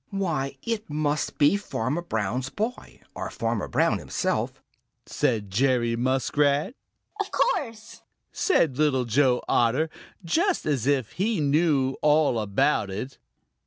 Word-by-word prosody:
"Why, 165 Hz, -9 st, -2 dB
it 225 Hz, -5 st, -3 dB
must 150 Hz, 0 st, -1 dB
be 145 Hz, +5 st, +4 dB
Farmer 145 Hz, -, -3 dB
Brown's 125 Hz, -, -2 dB
boy 225 Hz, -, -5 dB
or -, -, -5 dB
Farmer -, -, -2 dB
Brown -, -, +1 dB
himself," -, -, -2 dB, 0.5 s
said 110 Hz, -9 st, -1 dB
Jerry 120 Hz, +1 st, +2 dB
Muskrat. 140 Hz, -, +1 dB, 0.5 s
"Of 410 Hz, -, -2 dB
course," 230 Hz, -, -2 dB, 0.3 s
said 155 Hz, -, +1 dB
Little 135 Hz, -5 st, +2 dB
Joe 125 Hz, +2 st, +2 dB
Otter, 130 Hz, +7 st, +2 dB, 0.3 s
just 345 Hz, -, +1 dB
as 140 Hz, -5 st, 0 dB
if 135 Hz, -6 st, +1 dB
he 210 Hz, +2 st, -1 dB
knew 145 Hz, -2 st, +2 dB
all 150 Hz, -5 st, +3 dB
about 105 Hz, +1 st, +1 dB
it. 110 Hz, +8 st, -6 dB
145 Hz, 125 wpm, -25 LUFS, 125-170 Hz, 0.5 s, be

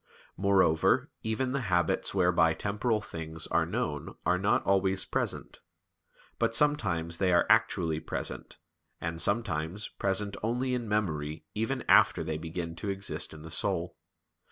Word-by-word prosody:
Moreover 95 Hz, -5 st, +3 dB
even 115 Hz, +4 st, -1 dB
the 140 Hz, 0 st, -1 dB
habits 85 Hz, -2 st, +2 dB
whereby 90 Hz, -3 st, +3 dB
temporal 105 Hz, +2 st, -1 dB
things 80 Hz, -4 st, -5 dB
are 80 Hz, 0 st, +1 dB
known 85 Hz, -7 st, -3 dB
are 90 Hz, +2 st, +2 dB
not 100 Hz, +3 st, +2 dB
always 95 Hz, 0 st, +2 dB
present; -, -, -3 dB, 0.8 s
but 115 Hz, -, +2 dB
sometimes 95 Hz, -, +2 dB
they 95 Hz, 0 st, +2 dB
are 85 Hz, -, +4 dB
actually 95 Hz, -8 st, +2 dB
present, 80 Hz, -, -6 dB, 0.4 s
and 85 Hz, 0 st, -4 dB
sometimes 100 Hz, -3 st, -1 dB
present 100 Hz, +1 st, -1 dB
only 125 Hz, +4 st, -1 dB
in 120 Hz, -3 st, -2 dB
memory 80 Hz, -7 st, -2 dB
even 120 Hz, +4 st, -2 dB
after -, -, +5 dB
they 80 Hz, -1 st, -3 dB
begin 85 Hz, +1 st, -5 dB
to 100 Hz, -, -4 dB
exist 95 Hz, -4 st, -3 dB
in 75 Hz, -1 st, -11 dB
the 80 Hz, -, -9 dB
soul. -, -, -1 dB
95 Hz, 140 wpm, -29 LUFS, 80-105 Hz, 0.8 s, after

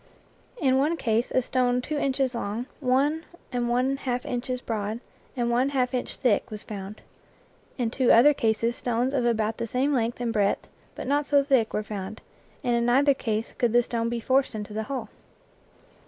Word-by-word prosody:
In 265 Hz, -3 st, +3 dB
one 310 Hz, +5 st, +1 dB
case 230 Hz, -3 st, 0 dB
a 255 Hz, -, +1 dB
stone 250 Hz, 0 st, +1 dB
two 295 Hz, +5 st, -4 dB
inches 270 Hz, -2 st, 0 dB
long, 230 Hz, +1 st, -3 dB
one 280 Hz, +4 st, +1 dB, 0.3 s
and 245 Hz, -1 st, -1 dB
one 255 Hz, +3 st, +1 dB
half 250 Hz, -2 st, -3 dB
inches 250 Hz, +1 st, -2 dB
broad, 220 Hz, -2 st, -3 dB, 0.4 s
and 240 Hz, -1 st, +1 dB
one 250 Hz, +3 st, +2 dB
half 255 Hz, -2 st, 0 dB
inch 250 Hz, -, -2 dB
thick 240 Hz, -6 st, +1 dB
was 215 Hz, -1 st, -6 dB
found. 200 Hz, 0 st, -7 dB, 0.8 s
In 240 Hz, -4 st, -1 dB
two 255 Hz, 0 st, +3 dB
other 275 Hz, +6 st, +7 dB
cases 230 Hz, -1 st, 0 dB
stones 245 Hz, +2 st, -1 dB
of 250 Hz, -3 st, +1 dB
about 220 Hz, -1 st, 0 dB
the 230 Hz, -, -3 dB
same 265 Hz, +5 st, +1 dB
length 235 Hz, -2 st, 0 dB
and 235 Hz, -2 st, -1 dB
breadth 205 Hz, -2 st, +1 dB, 0.3 s
but -, -, -6 dB
not 285 Hz, +2 st, +1 dB
so 285 Hz, -1 st, +4 dB
thick 265 Hz, -6 st, +2 dB
were 210 Hz, -, -1 dB
found, 210 Hz, 0 st, -6 dB, 0.4 s
and 245 Hz, -2 st, +2 dB
in 235 Hz, -, +1 dB
neither 275 Hz, +4 st, +4 dB
case 225 Hz, -3 st, -3 dB
could 240 Hz, -2 st, +2 dB
the 240 Hz, 0 st, +5 dB
stone 230 Hz, -1 st, -2 dB
be 235 Hz, 0 st, -2 dB
forced 260 Hz, +1 st, +1 dB
into 210 Hz, 0 st, -6 dB
the 220 Hz, +1 st, -3 dB
hole. 250 Hz, -6 st, -4 dB
245 Hz, 190 wpm, -26 LUFS, 225-265 Hz, 0.8 s, other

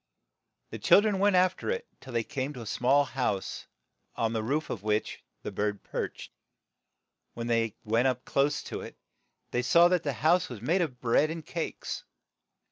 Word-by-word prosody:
The -, -, -6 dB
chil -, -, +6 dB
dren 205 Hz, -2 st, 0 dB
went 200 Hz, -1 st, +4 dB
after 185 Hz, 0 st, +2 dB
it 475 Hz, 0 st, -2 dB
till 130 Hz, -, -11 dB
they 115 Hz, -1 st, 0 dB
came 140 Hz, +2 st, -3 dB
to 125 Hz, -, -8 dB
a -, -, -10 dB
small 125 Hz, +7 st, +3 dB
house, 130 Hz, -8 st, -2 dB, 0.5 s
on 115 Hz, 0 st, 0 dB
the 110 Hz, -, 0 dB
roof 145 Hz, +8 st, -1 dB
of 105 Hz, -, -4 dB
which 105 Hz, +1 st, -1 dB, 0.2 s
the -, -, -4 dB
bird 105 Hz, -1 st, -2 dB
perched. -, -, -5 dB, 1.0 s
When 115 Hz, -, -4 dB
they 115 Hz, -2 st, +1 dB
went 115 Hz, +4 st, +2 dB
up 125 Hz, -1 st, -1 dB
close 140 Hz, +2 st, +1 dB
to -, -, -5 dB
it, -, -, -9 dB, 0.5 s
they 125 Hz, -, +1 dB
saw 170 Hz, +7 st, +6 dB
that 180 Hz, -2 st, +2 dB
the 145 Hz, -4 st, -2 dB
house 175 Hz, +3 st, +4 dB
was 120 Hz, -4 st, -7 dB
made 165 Hz, -, +1 dB
of 130 Hz, -8 st, -3 dB
bread 125 Hz, +5 st, +3 dB
and 160 Hz, -1 st, -5 dB
cakes. 165 Hz, -, -4 dB
130 Hz, 185 wpm, -29 LUFS, 115-170 Hz, 1.0 s, chil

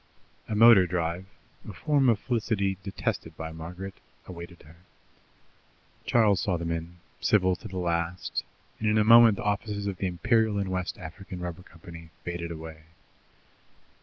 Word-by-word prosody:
A 110 Hz, -, -1 dB
motor 110 Hz, -4 st, +7 dB
drive, 85 Hz, +1 st, -2 dB, 0.4 s
a -, -, -7 dB
form 135 Hz, -, +2 dB
of 115 Hz, -, +4 dB
felicity 105 Hz, -4 st, -1 dB
detested 95 Hz, 0 st, -4 dB
by 80 Hz, 0 st, -5 dB
Margaret, 90 Hz, +4 st, -7 dB, 0.3 s
awaited 85 Hz, -1 st, -10 dB
her. 80 Hz, +3 st, -17 dB, 1.3 s
Charles 105 Hz, -5 st, +4 dB
saw 90 Hz, -4 st, 0 dB
them 85 Hz, 0 st, -3 dB
in, 85 Hz, +1 st, -5 dB, 0.2 s
civil 95 Hz, -3 st, +3 dB
to -, -, -9 dB
the 95 Hz, -, -7 dB
last, 85 Hz, 0 st, -2 dB, 0.4 s
and 110 Hz, -, +1 dB
in 105 Hz, -, +3 dB
a 105 Hz, -, +4 dB
moment 115 Hz, -1 st, +8 dB
the -, -, -5 dB
offices 105 Hz, 0 st, -2 dB
of 100 Hz, -2 st, -3 dB
the 95 Hz, -, -1 dB
Imperial 110 Hz, +4 st, +1 dB
and 100 Hz, -2 st, -2 dB
West 90 Hz, -1 st, -3 dB
African 90 Hz, +3 st, -9 dB
Rubber 90 Hz, 0 st, -5 dB
Company 85 Hz, -1 st, -13 dB
faded 85 Hz, -1 st, -4 dB
away. 80 Hz, -1 st, -9 dB
90 Hz, 155 wpm, -27 LUFS, 85-105 Hz, 1.3 s, moment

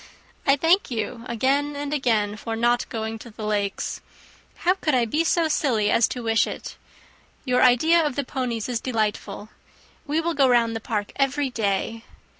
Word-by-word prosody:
I 275 Hz, -, +6 dB
thank 330 Hz, +6 st, +3 dB
you 230 Hz, -1 st, -3 dB
again 275 Hz, +5 st, 0 dB
and 285 Hz, 0 st, -4 dB
again, 220 Hz, -7 st, +1 dB
for 225 Hz, +1 st, -5 dB
not 240 Hz, +2 st, +1 dB
going 220 Hz, -1 st, -4 dB
to 235 Hz, -, -11 dB
the 215 Hz, 0 st, -8 dB
Lakes. 205 Hz, -2 st, -2 dB, 0.6 s
How 360 Hz, -, +5 dB
could 310 Hz, -7 st, 0 dB
I 245 Hz, -2 st, +3 dB
be 300 Hz, +9 st, 0 dB
so 335 Hz, -1 st, +2 dB
silly 240 Hz, -9 st, +1 dB
as 230 Hz, -, +4 dB
to 245 Hz, -, -5 dB
wish 225 Hz, 0 st, +2 dB
it! -, -, -7 dB, 0.7 s
Your 250 Hz, -1 st, +2 dB
idea 315 Hz, +7 st, +5 dB
of 295 Hz, -4 st, -1 dB
the 285 Hz, -, -1 dB
ponies 250 Hz, -4 st, -3 dB
is 240 Hz, -2 st, -2 dB
delightful. 215 Hz, -3 st, -2 dB, 0.6 s
We 300 Hz, +3 st, +1 dB
will 335 Hz, +1 st, -1 dB
go 275 Hz, -3 st, +3 dB
round 230 Hz, -2 st, +3 dB
the -, -, -2 dB
park 210 Hz, -2 st, -3 dB
every 275 Hz, 0 st, +1 dB
day. 225 Hz, +1 st, -1 dB
245 Hz, 180 wpm, -24 LUFS, 225-285 Hz, 0.7 s, I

